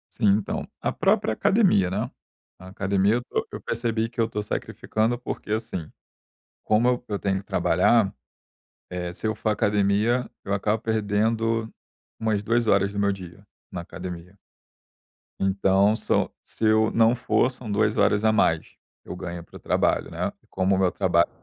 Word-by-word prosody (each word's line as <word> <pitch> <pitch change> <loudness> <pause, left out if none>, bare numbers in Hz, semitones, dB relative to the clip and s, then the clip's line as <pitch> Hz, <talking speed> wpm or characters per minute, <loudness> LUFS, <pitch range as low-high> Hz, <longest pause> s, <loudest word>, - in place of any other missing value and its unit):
Sim. 115 - -1
Então, 105 - -4
a - - 0
própria 110 - +1
academia, 175 - +3
né, 105 +7 -2 0.5
a 95 - -12
academia 100 +2 +1 0.2
eu - - -1
eu - - -7
percebi 115 -1 -1
que 120 - -13
eu 115 - +3
tô 105 - -3
sacrificando, 110 +2 -2
porque, 120 -3 -6
assim, 110 -7 -3 0.7
como 110 +3 +3
eu 125 -1 0
eu 100 - -2
tenho 95 -1 0
que 100 - -13
trabalhar, 110 0 +3 0.8
eh, 90 -1 -4
se 105 +4 -4
eu 110 - -1
for 110 +1 -2
à - - +3
academia, 105 +5 +1 0.2
eu 100 - -1
acabo 105 +2 0
perdendo 110 +1 0 0.5
umas 110 -2 0
2 115 +1 +1
horas 100 -1 +3
do 100 - -3
meu 100 0 +2
dia 95 0 -9 0.3
na 90 - -4
academia. 90 +1 -8 1.0
Então 95 +2 +3
são - - 0
se 110 - -4
eu 110 0 +4
não 115 +1 +4
for 125 +1 +1
são 125 -4 -8
2 105 +1 +2
horas 105 +1 +3
a 110 - +5
mais, 85 -6 +1 0.3
eu - - -6
ganho 85 -1 -6
pro - - -13
trabalho, - - +1
né, - - -2 0.2
como 95 +1 +1
o - - 0
meu 95 -2 +3
trabalho, 85 -3 +2
105 Hz, 170 wpm, -25 LUFS, 95-115 Hz, 1.0 s, a